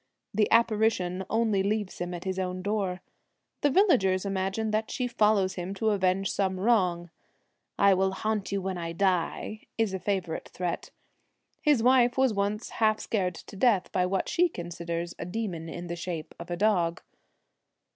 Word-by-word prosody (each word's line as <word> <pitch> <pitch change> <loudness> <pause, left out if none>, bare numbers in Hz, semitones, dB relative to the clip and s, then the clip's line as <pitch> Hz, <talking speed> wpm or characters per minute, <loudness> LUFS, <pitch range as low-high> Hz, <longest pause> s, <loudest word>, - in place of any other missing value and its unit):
The 210 +1 +2
apparition 215 -5 +2
only 220 -3 +2
leaves 205 0 -2
him 175 0 -2
at 175 - -7
his 190 0 -2
own 185 0 -3
door. 195 -3 -1 0.6
The 290 - +4
villagers 245 - +3
imagine 195 +3 -1
that 215 +1 0
she 250 - -2
follows 210 -5 +2
him 180 +2 -5
to 220 +2 +1
avenge 190 -1 +1
some 190 -2 -1
wrong. 180 -6 +2 0.6
1 200 - +5
I - - +6
will 190 +1 +2
haunt 215 0 -2
you 195 -1 -1
when 190 -1 -3
I 165 -1 -4
die 190 +4 0
' - - -51
is 225 -4 +1
a 190 - -2
favourite 185 -5 -2
threat. 180 -2 -4 0.7
His 290 -7 +3
wife 245 -1 +4
was 260 -3 +3
once 205 +2 -2
half 215 -1 +4
scared 185 -5 -1
to 200 - -11
death 200 -3 +2
by 180 -1 +1
what 190 +1 -1
she 355 +1 +3
considers 170 - -5
a - - -4
demon 180 -5 -4
in 175 +2 -6
the 170 0 -4
shape 170 -2 -5
of 170 +1 -8
a 175 - -2
dog. 175 -5 +1
195 Hz, 175 wpm, -28 LUFS, 180-220 Hz, 0.7 s, I